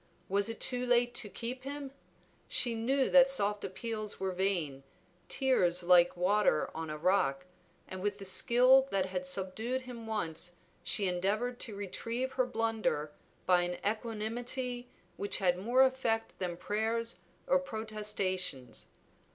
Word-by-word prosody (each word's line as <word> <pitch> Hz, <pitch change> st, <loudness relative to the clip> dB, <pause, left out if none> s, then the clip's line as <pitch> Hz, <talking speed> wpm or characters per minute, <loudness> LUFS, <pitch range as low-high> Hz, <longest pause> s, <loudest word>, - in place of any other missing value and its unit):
Was 200 Hz, +3 st, +1 dB
it 225 Hz, -, -6 dB
too 250 Hz, -1 st, +1 dB
late 245 Hz, -1 st, +2 dB
to 215 Hz, -, -1 dB
keep 245 Hz, +4 st, -5 dB
him? 280 Hz, 0 st, -6 dB, 0.6 s
She 240 Hz, -2 st, +2 dB
knew 260 Hz, +4 st, +1 dB
that 270 Hz, -1 st, +7 dB
soft 210 Hz, -6 st, 0 dB
appeals 215 Hz, +2 st, -4 dB
were 190 Hz, 0 st, -1 dB
vain, 180 Hz, -7 st, -1 dB, 0.5 s
tears 180 Hz, -10 st, +2 dB
like 175 Hz, 0 st, +5 dB
water 185 Hz, -2 st, +2 dB
on 160 Hz, 0 st, -5 dB
a 155 Hz, -, -4 dB
rock, 170 Hz, -5 st, +1 dB, 0.4 s
and 185 Hz, 0 st, -7 dB
with 205 Hz, +1 st, -1 dB
the 200 Hz, -, -8 dB
skill 255 Hz, +7 st, +5 dB
that 195 Hz, -5 st, +1 dB
had 185 Hz, -1 st, -3 dB
subdued 215 Hz, +8 st, -1 dB
him 240 Hz, -3 st, -9 dB
once 175 Hz, -5 st, -2 dB, 0.3 s
she 200 Hz, -, +1 dB
endeavored 205 Hz, +7 st, -1 dB
to 220 Hz, -4 st, -4 dB
retrieve 230 Hz, +6 st, -3 dB
her 255 Hz, -, +1 dB
blunder 225 Hz, -10 st, -1 dB, 0.3 s
by 180 Hz, -1 st, +4 dB
an 175 Hz, 0 st, -2 dB
equanimity 240 Hz, +3 st, -3 dB, 0.3 s
which 200 Hz, -, +1 dB
had 180 Hz, -2 st, +1 dB
more 240 Hz, +7 st, +4 dB
effect 250 Hz, -4 st, 0 dB
than 175 Hz, -2 st, -3 dB
prayers 220 Hz, +4 st, -1 dB, 0.3 s
or 275 Hz, -, +3 dB
protestations. 210 Hz, -, -2 dB
215 Hz, 145 wpm, -32 LUFS, 185-245 Hz, 0.6 s, that